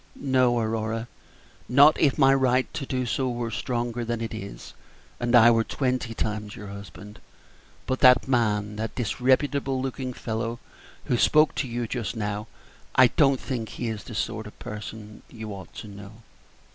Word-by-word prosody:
No, 130 -3 +2
Aurora, 110 0 -2 0.6
not 140 +4 +7
if 140 -4 +3
my 135 -2 +6
right 130 -1 +3
to 135 - -4
do 130 -1 -1
so 130 +2 -1
were 120 -1 -3
stronger 120 +1 -2
than 115 0 -2
it 115 0 -4
is, 100 -2 -8 0.5
and 120 0 +1
I 120 0 +8
were 115 -1 +3
twenty 125 -2 -2
times 105 -1 -3
your 105 -1 -9
husband; 100 +1 -10 0.7
but 130 - -1
that 125 0 +6
man, 105 -5 0
that 110 0 -4
disreputable 130 +3 +1
looking 130 0 -3
fellow 115 0 -4 0.5
who 120 - +1
spoke 155 +5 +4
to 135 - -2
you 120 0 -3
just 120 0 -3
now 105 0 -3 0.5
I 130 -1 +7
don't 135 -3 +3
think 120 -5 -4
he 120 - -4
is 110 -2 -5
the 115 - -8
sort 110 0 -3
of 105 - -13
person 105 0 -8
you 110 -3 -7
ought 95 -4 -10
to - - -8
assist." 100 0 -10
120 Hz, 170 wpm, -26 LUFS, 110-130 Hz, 0.7 s, I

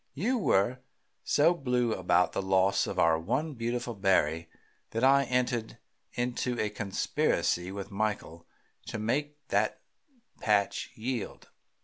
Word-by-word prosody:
You 235 - 0
were 120 - +2 0.4
so 150 +4 +4
blue 125 -7 0
about 90 -1 +2
the - - -2
loss 95 0 +2
of - - -5
our 80 -1 +4
one 140 - -1
beautiful 120 0 -3
berry 85 -5 +1 0.4
that 115 - -3
I 140 +1 +5
entered 125 -3 -1 0.4
into 120 0 -2
a 105 - 0
conspiracy 95 -3 0
with 100 +1 -6
Michael 100 -5 -3 0.4
to - - -4
make 145 +7 -2
that - - +1 0.6
patch 105 -3 +1
yield. 120 -1 -5
115 Hz, 125 wpm, -29 LUFS, 95-125 Hz, 0.6 s, I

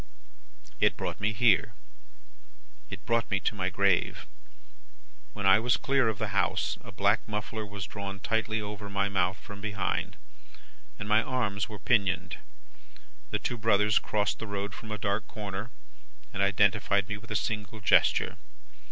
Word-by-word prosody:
"It - - +3
brought - - -4
me 100 +2 +1
here, 110 -2 +3 1.2
it - - -8
brought 115 0 +1
me 100 - +1
to - - 0
my 95 -3 -1
grave. 95 -1 +1 1.1
When 100 -2 -4
I 95 +2 +7
was 120 +2 +2
clear 135 -4 +2
of 110 - -3
the - - -2
house, - - 0
a - - -10
black 100 +1 +3
muffler 110 +1 -3
was 100 -2 -6
drawn 100 -1 -6
tightly 110 +1 0
over 105 0 -6
my 100 0 0
mouth 95 -1 +1
from 100 0 -11
behind, 105 -2 -2 0.8
and 100 - -6
my 105 +1 +5
arms 110 -5 -1
were 105 - -7
pinioned. 100 -2 +1 0.9
The - - 0
two 120 - -3
brothers 105 -1 +4
crossed 105 -1 -1
the 110 - -5
road 100 0 -3
from 110 +1 -9
a 105 - -3
dark 100 +2 -1
corner, 105 +1 -5 0.6
and 100 - -2
identified 100 0 +3
me 105 -1 -3
with 105 - -14
a 105 - -3
single 110 -1 -2
gesture. 100 - +3
105 Hz, 160 wpm, -29 LUFS, 100-110 Hz, 1.2 s, I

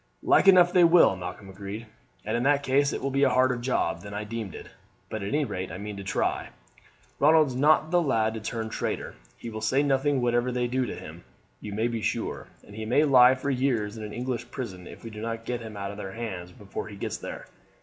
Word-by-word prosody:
"Like - - +4
enough 180 -2 +7
they 180 - +6
will," 165 - +6
Malcolm 95 +2 -7
agreed, 100 +3 -7 0.4
"and - - -1
in 120 - 0
that 140 +2 +3
case 140 +1 +2
it - - -4
will 135 - -1
be 140 +1 +1
a 140 - +5
harder 130 0 +3
job 120 -9 -1
than 100 0 -8
I 105 - -3
deemed 105 -3 -5
it. - - -9 0.5
But 110 - -3
at 100 - -3
any 145 +5 +1
rate 95 -7 -5
I 90 - -6
mean 105 +1 -6
to 100 - -6
try. 95 - -1 0.7
Ronald's 155 -2 +5
not 155 +4 +3
the 175 -1 +4
lad 115 -7 +1
to 110 - -4
turn 110 0 -4
traitor; - - -3 0.2
he 115 - -7
will 110 0 -6
say 130 +6 +2
nothing 140 0 +2
whatever 120 0 +1
they 125 0 0
do 125 +1 0
to - - -5
him, - - -10 0.4
you 105 - -7
may 110 +3 0
be 115 -2 -3
sure, - - -2 0.2
and 100 - -14
he 110 - -5
may 125 +7 +3
lie 130 -3 +7
for 140 +2 -2
years 125 -5 0
in 110 - -7
an 105 - -6
English 125 +1 -4
prison 95 -9 -6
if - - -12
we 115 - -7
do 105 0 -8
not 115 0 -4
get 120 0 -3
him 110 -2 -8
out 100 0 -4
of 100 - -9
their 95 -2 -6
hands 95 -6 -6
before 100 +1 -7
he 105 - -9
gets 100 - -4
there. - - -7
115 Hz, 240 wpm, -27 LUFS, 105-135 Hz, 0.7 s, enough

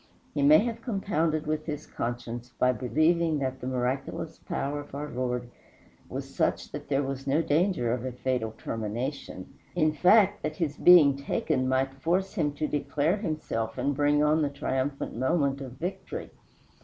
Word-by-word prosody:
He 145 - -1
may 145 +2 +8
have 230 -1 -3
compounded 170 - 0
with 155 +1 -2
his 150 -1 -4
conscience 120 0 -5
by 125 - +4
believing 155 +5 +2
that 130 -2 -3
the 125 - -4
miraculous 130 +1 -2
power 145 +1 -3
of 145 -1 -9
our 145 +1 -4
Lord 125 -1 -2 0.6
was - - -6
such - - 0
that - - -7
there 140 0 +2
was 135 0 -5
no 150 +5 +2
danger 160 - +1
of 125 -1 -3
a 130 - -3
fatal 125 -3 -2
termination. 115 -1 -4 0.2
In 155 -3 +3
fact, 185 +5 +5
that 155 0 -3
his 155 -3 -1
being 160 -6 +7
taken 130 -2 -1
might 135 +1 +1
force 190 +5 +1
him 150 -7 0
to 150 +1 -2
declare 150 +5 0
himself 155 - -3
and 140 0 0
bring 145 +1 +3
on 155 +1 +3
the 145 - +1
triumphant 140 0 -2
moment 140 +2 +1
of 130 -3 -7
victory. 175 +9 -5
145 Hz, 170 wpm, -28 LUFS, 130-155 Hz, 0.6 s, may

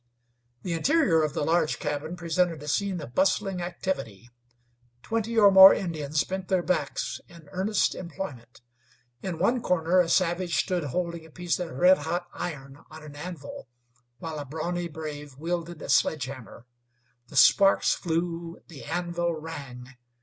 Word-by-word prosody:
The 175 - -2
interior 190 - +3
of 155 -2 -1
the - - 0
large 160 0 +1
cabin 150 +3 -4
presented 170 -2 -1
a - - -9
scene 190 +4 0
of 125 -5 -9
bustling 190 +1 +1
activity. 135 - -5 0.7
Twenty 225 +1 -2
or 205 -2 +7
more 190 0 +10
Indians 155 -4 -1
bent 190 -1 -5
their 185 -2 +1
backs 155 -6 -2
in 165 -3 -16
earnest 195 +3 +1
employment. 140 -10 -8 0.6
In 185 -4 -4
one 235 +8 +1
corner 180 -3 +2
a 175 -2 +3
savage 175 -1 +1
stood 180 -4 0
holding 170 +3 -3
a 160 - -15
piece 175 +2 -2
of 175 -2 -3
red 180 +7 +4
hot 170 +4 -3
iron 140 -4 -6
on 155 0 -12
an 150 -1 -11
anvil, 150 -3 -8 0.5
while 155 +3 -6
a 145 - -5
brawny 170 +5 -3
brave 150 -3 -8
wielded 170 +1 -4
a - - -7
sledge 150 -5 +2
hammer. 130 -3 -10 0.6
The - - -7
sparks 195 0 +5
flew; 170 0 -3
the 155 -5 -11
anvil 170 +1 -2
rang. 145 -6 -8
170 Hz, 155 wpm, -27 LUFS, 150-180 Hz, 0.7 s, more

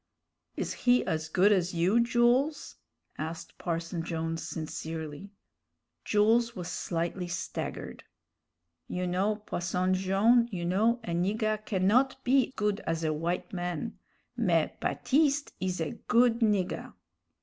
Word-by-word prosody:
"Is - - -2
he 245 0 +3
as 160 -2 -2
good 190 +5 +4
as 180 -3 +1
you, 180 +7 +3
Jools?" 240 - +2 0.4
asked 160 +2 -6
Parson 170 0 -3
Jones, 165 -1 -3
sincerely. 160 +2 -5 0.7
Jules 225 +3 +3
was 180 -1 -5
slightly 175 +1 -2
staggered. 175 - -5 0.8
"You 180 0 -2
know, 190 +4 +1
Posson 185 -3 -1
Jone', 200 +6 +3
you 175 -3 -3
know, 220 +7 +2
a 175 - -4
nigger 215 +5 0
cannot 215 +8 +3
be 265 +1 +3
good 210 0 0
as 165 0 -1
a 160 - +1
w'ite 165 +5 -2
man 175 -3 -4 0.4
mais - - +2
Baptiste 290 +1 +1
is 185 -1 -2
a 160 -3 -1 0.2
good 235 -1 +4
nigger." 205 -5 0
185 Hz, 125 wpm, -29 LUFS, 170-230 Hz, 0.8 s, good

